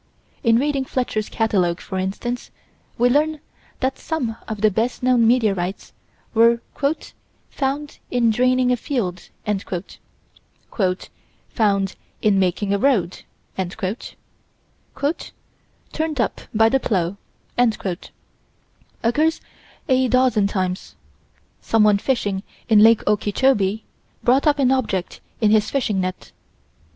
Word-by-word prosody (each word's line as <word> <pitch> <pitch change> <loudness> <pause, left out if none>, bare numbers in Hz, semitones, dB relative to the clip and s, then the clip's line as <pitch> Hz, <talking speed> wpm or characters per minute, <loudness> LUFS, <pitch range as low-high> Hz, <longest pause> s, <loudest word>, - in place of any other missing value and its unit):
In 230 -2 +5
reading 280 +1 +1
Fletcher's 245 -5 -2
catalogue, 185 -6 +1
for 190 - -5
instance, 220 +6 -3 0.5
we 245 - +4
learn 300 +4 +2 0.4
that 260 +1 -1
some 260 -9 -2
of 215 -2 -5
the 215 -1 +4
best 230 +5 -1
known 245 -3 +4
meteorites 205 -6 0 0.4
were 230 +1 +5 0.9
"found 285 +2 -3
in 240 -2 +2
draining 255 +2 +2
a 250 - +2
field" 195 -9 -3 2.2
"found 200 -4 +1 0.2
in 205 -2 +3
making 195 +2 +1
a 200 - +1
road" 200 -9 +1 1.8
"turned 310 0 -5
up 230 - 0
by 225 0 +4
the 270 +4 +2
plow" 190 -5 -1 1.9
occurs 305 +8 +2 0.5
a 260 -2 +3
dozen 250 -5 +3
times. 185 -2 -3 0.7
Someone 210 -2 +3
fishing 205 -6 -1 0.3
in 220 -2 +6
Lake 225 +1 +6
Okeechobee, 210 0 +1 0.4
brought 260 +5 +3
up 295 -1 +4
an 265 -2 +3
object 205 -9 -1 0.2
in 210 -1 +4
his 215 0 +3
fishing 220 -8 0
net. 185 0 -5
225 Hz, 105 wpm, -21 LUFS, 200-260 Hz, 2.2 s, in